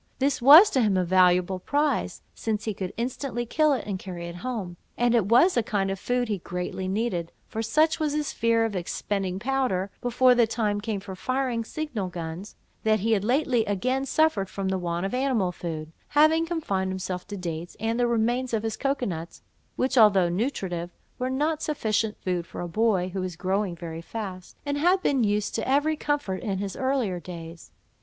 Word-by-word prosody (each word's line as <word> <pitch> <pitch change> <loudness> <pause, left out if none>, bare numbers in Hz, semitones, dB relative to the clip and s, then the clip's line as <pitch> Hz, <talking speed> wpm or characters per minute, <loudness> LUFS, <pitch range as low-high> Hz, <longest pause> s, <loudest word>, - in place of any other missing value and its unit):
This 275 -1 0
was 305 - +9
to 260 - +2
him 205 -4 +2
a 185 - +1
valuable 180 0 +3
prize, 290 +9 -1
since 215 -2 -2
he 215 - -2
could 185 -1 -4
instantly 240 0 -3
kill 305 +6 +2
it, 265 - -2
and 195 -3 -3
carry 175 -3 -7
it 170 0 -7
home; 210 -6 -4 0.2
and 240 0 +2
it 225 -5 +3
was 255 - +5
a 240 - +3
kind 200 -3 -1
of 195 - -4
food 245 +3 0
he 205 -3 -2
greatly 180 +2 -4
needed, 190 -4 -1 0.2
for 220 - -4
such 310 +9 +2
was 305 -2 0
his 300 -1 -2
fear 230 0 +2
of 220 -3 -3
expending 185 +1 -2
powder, 215 -5 -1
before 250 +1 +4
the 240 -2 +4
time 210 -2 -1
came 210 -2 -3
for 195 -1 -8
firing 255 +2 -1
signal 240 -6 -4
guns, 175 +2 -7 0.3
that 215 -2 +2
he 225 +3 +1
had 205 -3 +2
lately 250 0 +2
again 255 +7 0
suffered 275 - +1
for 195 - -5
the 190 0 0
want 175 +1 -2
of 195 - -3
animal 250 -8 +1
food, 160 -3 -6 0.2
having 315 +2 +4
confined 200 - -1
himself 185 -1 -4
to 205 0 -6
dates, 170 -1 -5
and 225 +2 -1
the 245 - +3
remains 235 +2 +1
of 215 - -2
his 225 -1 -2
cocoa 275 -2 0
nuts, 170 -4 -6 0.3
which 260 0 +1
although 195 -5 +6
nutritive, 180 -4 -2 0.3
were 255 +1 -1
not 300 +4 0
sufficient 220 -7 -1
food 180 -2 -1
for - - -7
a 175 - -3
boy 195 -1 +1
who 190 +1 -4
was 185 -2 -4
growing 190 +1 -1
very 165 -1 -7
fast, 185 -1 -7
and 285 0 -1
had 360 +4 +3
been 270 -4 +2
used 210 0 0
to 225 - -2
every 290 +3 +2
comfort 290 -11 -2
in 200 -5 -2
his 195 -1 -4
earlier 260 -9 0
days. 170 -1 -9
215 Hz, 200 wpm, -26 LUFS, 185-255 Hz, 0.3 s, was